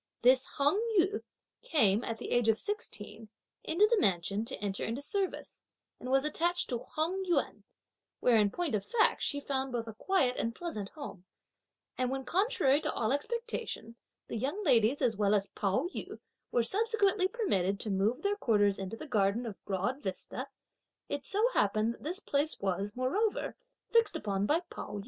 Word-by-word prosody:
This 255 +2 +6
Hung 285 +7 +3 0.2
yü 390 +4 +2 0.4
came, 235 - +3
at 230 - -3
the - - -7
age 240 -2 +2
of 220 - +4
sixteen, 215 - -3 0.3
into 345 +6 +4
the 425 -1 +3
mansion, 195 - +1
to 265 - -5
enter 200 -1 -3
into 230 +4 -2
service, 380 +6 -3 0.4
and 255 - -6
was 270 +2 +3
attached 345 +3 0
to 245 - 0
the - - -13
Hung 350 +5 0
Yuan, 350 -2 0 0.5
where 245 - +4
in 210 -1 +4
point 340 - -2
of 205 -2 0
fact 450 - +2
she 285 - -1
found 270 -2 -2
both 235 -2 -2
a 225 - -6
quiet 265 - +1
and 230 0 -1
pleasant 215 - -5
home; 240 - -9 0.7
and 255 -1 +1
when 265 0 -3
contrary 350 - +2
to - - -1
all 220 0 0
expectation, 455 - -3 0.3
the - - -4
young 290 - -2
ladies 255 - +3
as 230 -5 +2
well 205 0 +3
as 200 -1 +2
Pao 205 - -1
yü, - - -6 0.3
were 240 - +3
subsequently 405 - +2
permitted 200 - 0
to 215 - -3
move 210 +8 +1
their 405 0 +2
quarters 205 - +2
into 195 +3 -5
the 310 - -7
garden 215 -2 +1
of 215 -4 -7
Broad 200 +9 -1
Vista, 190 -6 -5 0.6
it 285 -1 -3
so 420 - +2
happened 215 +3 +2
that - - -16
this 350 +6 -2
place 295 -5 -1
was, 195 +2 -2
moreover, 385 - 0 0.4
fixed 460 -5 +4
upon 200 -8 -1
by 320 +3 +3
Pao 345 - -8
yü. - - -3
255 Hz, 180 wpm, -31 LUFS, 210-350 Hz, 0.7 s, This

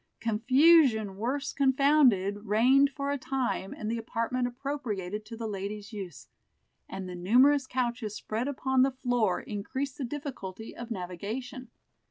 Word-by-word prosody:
"Confusion 235 - +4
worse 260 +7 -2
confounded" 265 -8 +3
reigned 255 +7 +5
for 280 -1 -3
a 285 - -2
time 255 -7 -2
in 215 - -6
the 230 +1 -1
apartment 230 +2 -1
appropriated 240 -7 -4
to 230 - -8
the 230 - -5
ladies' 205 +1 -5
use, 190 -7 -8 0.6
and 190 -1 -6
the 180 - -6
numerous 255 +10 +4
couches 240 -4 -2
spread 220 +4 -3
upon 265 -2 +1
the 260 0 +2
floor 235 -7 +1
increased 260 +7 -5
the - - -2
difficulty 235 -7 -6
of 240 0 -8
navigation. 225 +7 -5
235 Hz, 140 wpm, -29 LUFS, 210-270 Hz, 0.6 s, reigned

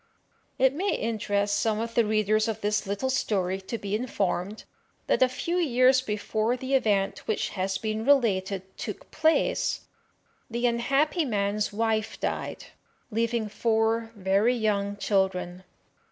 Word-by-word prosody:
It 265 0 +4
may 380 +7 0
interest 205 -2 0
some 220 -1 +1
of 230 +1 -3
the 235 - +4
readers 215 0 +2
of 220 -1 -3
this 210 0 0
little 205 +7 -1
story 195 -7 0
to 210 +5 -5
be 200 -2 -5
informed, 205 -3 -2 0.4
that - - +1
a 255 - +6
few 335 +7 -2
years 260 -5 +4
before 220 +1 -1
the 260 +2 -4
event 205 -7 +2
which 220 - 0
has 190 0 -2
been 220 0 -3
related 200 -8 +2 0.2
took 210 -4 -6
place, 315 +1 +1 0.7
the 240 +1 -1
unhappy 275 +8 +2
man's 210 -4 0
wife 220 0 -1
died, - - -3 0.5
leaving 230 0 0
four 225 +1 0
very 200 +5 +2
young 205 -3 0
children. 190 -3 0
220 Hz, 140 wpm, -27 LUFS, 200-245 Hz, 0.7 s, a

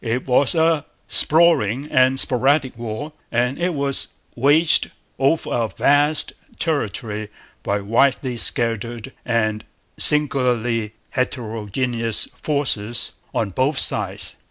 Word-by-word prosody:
It 120 +3 -3
was 135 +6 +3
a 160 -2 +2 0.2
sprawling 150 -7 +3
and 130 -1 +3
sporadic 130 +2 +1
war; 120 +6 -6 0.2
and 125 +4 -1
it 175 -1 -1
was 140 -1 0 0.3
waged 150 +6 +3 0.3
over 140 +4 0
a 115 -2 0
vast 145 +8 +2 0.2
territory 110 - -3 0.3
by 100 0 -2
widely 125 +4 +1
scattered 115 +1 +1
and 110 -3 -1 0.4
singularly 125 -7 +2 0.2
heterogeneous 115 -1 -1
forces 120 -7 -2 0.2
on 105 -3 -2
both 135 - 0
sides. - - -1
125 Hz, 105 wpm, -20 LUFS, 115-145 Hz, 0.4 s, was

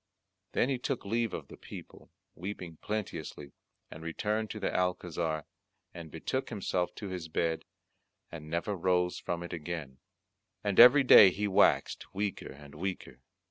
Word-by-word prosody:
Then - - +2
he 130 -2 0
took 125 -2 -3
leave 115 +1 0
of - - -6
the - - -12
people, - - -11 0.2
weeping 90 -3 -7
plenteously, 85 -9 -5 0.4
and 80 - -9
returned 105 +7 -2
to 110 - -6
the 100 - -2
Alcazar, 85 -4 -1 0.5
and 85 -2 -9
betook 105 - -3
himself 95 -5 -2
to 100 - -6
his 90 -3 -5
bed, 80 0 -1 0.7
and 75 -2 -8
never 85 +5 -1
rose 90 0 +1
from 85 0 -3
it 85 - -7
again; 80 -5 -6 0.6
and 100 -2 +1
every 125 +4 +10
day 105 -6 +10
he 105 +3 -2
waxed 95 0 +2
weaker 100 0 -2
and 70 +1 -13
weaker. 90 -6 -5
90 Hz, 150 wpm, -31 LUFS, 80-105 Hz, 0.7 s, every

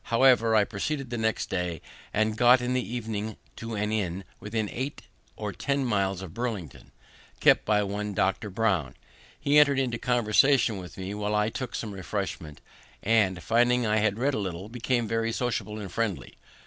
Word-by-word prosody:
However, 115 -2 +4
I 105 - +6
proceeded 125 +6 -3
the 120 - -2
next 110 -1 -1
day, 90 -3 -2 0.3
and 110 0 +1
got 125 +2 +6
in 125 +1 -1
the 130 - +1
evening 110 -2 -4 0.2
to 115 -1 -5
an 105 +1 -1
inn, 95 -4 -2 0.2
within 105 0 -2
eight 135 +4 -4 0.3
or - - -4
ten 140 -1 -1
miles 95 -4 0
of 85 -4 -9
Burlington, 110 - -5 0.5
kept - - +5
by 105 -1 +3
one 100 0 -3
Dr. 95 +3 0
Brown. 95 - 0 0.4
He 145 +1 +4
entered 140 -2 +5
into 125 -3 0
conversation 120 0 +3
with 90 -1 -10
me 95 +1 -5
while 105 0 -1
I 105 +1 +2
took 125 +1 -5
some 110 - -4
refreshment, 95 -5 -5 0.4
and, 100 -6 +2
finding 120 +4 +3
I 105 0 +2
had 105 -1 +1
read 140 +4 +1
a - - -1
little, 95 0 -4
became 120 0 -1
very 115 +1 0
sociable 115 -2 -2
and 100 -4 -7
friendly. 105 -3 -2
110 Hz, 175 wpm, -27 LUFS, 100-120 Hz, 0.5 s, I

